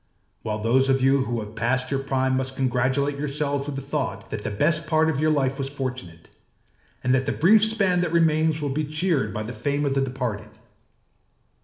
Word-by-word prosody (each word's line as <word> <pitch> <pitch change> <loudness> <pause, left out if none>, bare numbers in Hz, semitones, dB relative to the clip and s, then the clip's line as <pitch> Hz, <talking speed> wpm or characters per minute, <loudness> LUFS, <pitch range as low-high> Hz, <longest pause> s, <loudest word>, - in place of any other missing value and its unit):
While 105 -1 -3
those 125 +5 +2
of 135 -1 +2
you 135 0 +3
who 120 -2 -2
have 105 0 -9
passed 125 +3 -1
your 135 - 0
prime 130 -1 0
must 130 0 -2
congratulate 130 +2 0
yourselves 145 -1 -2
with 145 - -4
the 135 - -5
thought 140 -2 -4
that 105 - -4
the - - -2
best 155 +9 +1
part 160 +1 +3
of 140 - -3
your 155 +1 +2
life 135 -2 0
was 135 0 -2
fortunate, 125 -12 -6 0.8
and 125 - +2
that 130 0 +1
the - - +1
brief 210 +7 +5
span 200 -5 +2
that 175 - -1
remains 160 -1 +2
will 145 - -1
be 150 +3 -1
cheered 155 - 0
by 110 +1 -4
the 115 +3 -6
fame 145 +6 -1
of 140 - 0
the 135 - +1
departed. 125 -6 -3
135 Hz, 205 wpm, -24 LUFS, 130-150 Hz, 0.8 s, brief